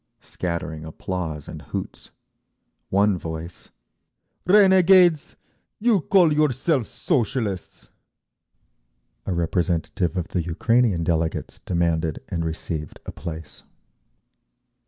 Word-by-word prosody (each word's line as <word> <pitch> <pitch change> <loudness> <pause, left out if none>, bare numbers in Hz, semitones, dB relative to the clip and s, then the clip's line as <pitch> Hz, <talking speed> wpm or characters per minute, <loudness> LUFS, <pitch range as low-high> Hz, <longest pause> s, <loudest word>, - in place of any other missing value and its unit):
Scattering 85 -3 -4
applause 80 -1 -5
and - - -8
hoots. - - -7 0.8
One 100 -1 +2
voice, 80 +1 -7 0.8
"Renegades, 185 -4 +5 0.4
you 220 -4 +3
call 175 -3 +4
yourselves 145 - +1
Socialists!" 115 - -2 1.4
A 95 - 0
representative 85 +1 -1
of 90 - -3
the 90 - -1
Ukrainean 95 +3 +1
delegates 80 -1 -1
demanded, 85 -3 -1
and 85 -1 -2
received, 80 -1 -5
a - - -6
place. 80 -3 -8
90 Hz, 90 wpm, -23 LUFS, 80-135 Hz, 1.4 s, Renegades